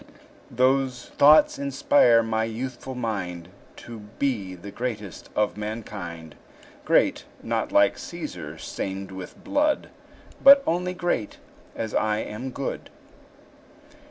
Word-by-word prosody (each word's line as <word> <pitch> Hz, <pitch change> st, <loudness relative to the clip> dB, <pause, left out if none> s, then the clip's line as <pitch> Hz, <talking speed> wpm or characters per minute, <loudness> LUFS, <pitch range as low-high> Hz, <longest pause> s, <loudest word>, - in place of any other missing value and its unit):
Those 130 Hz, 0 st, +1 dB
thoughts 150 Hz, +2 st, +5 dB
inspire 135 Hz, -4 st, +4 dB
my 110 Hz, 0 st, 0 dB
youthful 125 Hz, +3 st, -6 dB
mind 90 Hz, -8 st, -4 dB, 0.4 s
To 115 Hz, -1 st, -8 dB, 0.2 s
be 105 Hz, -10 st, -1 dB
the 90 Hz, +3 st, -10 dB
greatest 110 Hz, -6 st, -5 dB
of 105 Hz, -1 st, 0 dB
mankind; 100 Hz, -7 st, -6 dB, 0.5 s
Great, -, -, +2 dB, 0.2 s
not -, -, -2 dB
like -, -, +4 dB
Cæsar, -, -, -7 dB
stained 95 Hz, 0 st, -5 dB
with 95 Hz, -1 st, -9 dB
blood; 295 Hz, +1 st, 0 dB, 0.5 s
But 275 Hz, 0 st, +9 dB
only 180 Hz, +2 st, -1 dB
great, 175 Hz, -, -2 dB, 0.4 s
as 110 Hz, -2 st, -4 dB
I 105 Hz, -1 st, +1 dB
am 110 Hz, +4 st, -5 dB
good. 135 Hz, +1 st, -5 dB
115 Hz, 110 wpm, -25 LUFS, 100-135 Hz, 0.5 s, But